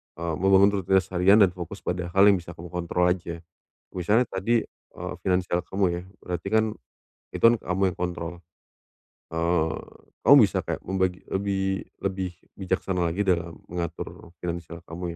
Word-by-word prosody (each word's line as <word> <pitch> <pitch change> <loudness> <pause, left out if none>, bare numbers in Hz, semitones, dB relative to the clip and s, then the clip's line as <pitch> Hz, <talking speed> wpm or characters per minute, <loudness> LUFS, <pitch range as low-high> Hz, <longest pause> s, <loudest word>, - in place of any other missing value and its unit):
eee, 85 0 -3
membangun 95 +1 +5
rutinitas 95 +1 +2
harian 95 +4 +5
dan 95 - +7
fokus 90 +2 -8
pada 90 0 -2
hal 100 +2 +7
yang 100 - +5
bisa 85 0 -9
kamu 85 +2 -10
kontrol 90 0 +1
aja, 85 -2 -3 0.5
misalnya 105 +7 +2
tadi, 115 +5 +1
eee, - - -9
finansial 90 -1 +1
kamu 95 +1 0
ya 85 0 -3 0.2
berarti 90 +1 -4
kan, 110 0 +4 0.7
itu - - -5
kan 120 - +6
kamu 90 +1 -2
yang - - -20
kontrol, 90 -1 -3 1.0
eee, 80 0 +1 0.5
kamu 140 - +8
bisa 95 - -2
kayak - - -3
membagi 95 -1 0
lebih 95 -1 0 0.2
lebih 95 -1 -2 0.2
bijaksana 95 -1 -1
lagi 100 +4 -1
dalam 85 -3 0
mengatur 85 -1 -6
finansial 85 -1 -5
kamu 85 +2 -8
90 Hz, 155 wpm, -26 LUFS, 85-95 Hz, 1.0 s, kamu